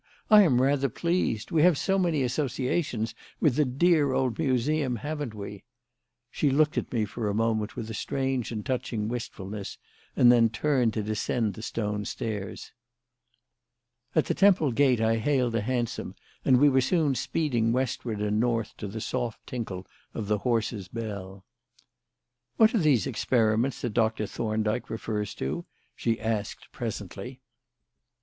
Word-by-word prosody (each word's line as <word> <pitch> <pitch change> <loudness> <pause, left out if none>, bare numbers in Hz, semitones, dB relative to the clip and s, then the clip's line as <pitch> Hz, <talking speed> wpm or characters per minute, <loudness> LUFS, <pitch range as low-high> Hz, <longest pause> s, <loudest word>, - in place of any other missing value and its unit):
"I 210 -1 +10
am 130 -10 +4
rather 140 0 +2
pleased. 170 -5 -1
We 160 - +3
have 175 -2 +5
so 195 +5 +1
many 165 -6 +1
associations 125 -2 -1 0.3
with 145 -6 +3
the 150 0 +3
dear 145 +1 +3
old 130 -1 0
Museum, 135 -1 +1
haven't 145 -2 -4
we?" 100 -1 -8 0.7
She 145 - +1
looked 150 +2 +3
at - - -2
me 115 -4 +1
for 105 +1 -3
a 100 - -1
moment 110 -1 0
with 110 - -5
a 110 - -6
strange 130 +1 -2
and 110 -3 -4
touching 115 -4 -2
wistfulness 105 -4 -5 0.4
and 120 - +7
then 115 -2 +5
turned 120 -1 +1
to 110 - -1
descend 110 +1 -1
the 110 - -9
stone 105 -2 -3
stairs. 105 -3 -5 1.4
At - - +3
the - - 0
Temple 185 -8 +4
gate, 130 -1 +3
I 115 0 +2
hailed 125 0 +1
a 115 - +1
hansom 120 +1 -2 0.3
and 130 - +5
we 145 +3 +6
were 135 -2 +4
soon 150 +1 +2
speeding 125 -5 0
westward 120 -3 -2
and 105 0 +1
north 115 -2 0
to 105 - -5
the 110 +3 -6
soft 120 0 -3
tinkle 100 -7 -5 0.3
of 110 -3 -3
the 105 0 +1
horse's 115 -4 -1
bell. 100 -4 -6 1.1
"What 220 -1 +6
are 230 - +3
these 150 - +3
experiments 115 +2 +1
that 120 -4 -2
Doctor 110 -1 +1
Thorndyke 110 +2 -2
refers 105 -2 -3
to?" 70 +3 -3 0.3
she 115 -1 -1
asked 110 -2 -3
presently. - - -6
120 Hz, 155 wpm, -27 LUFS, 110-135 Hz, 1.4 s, I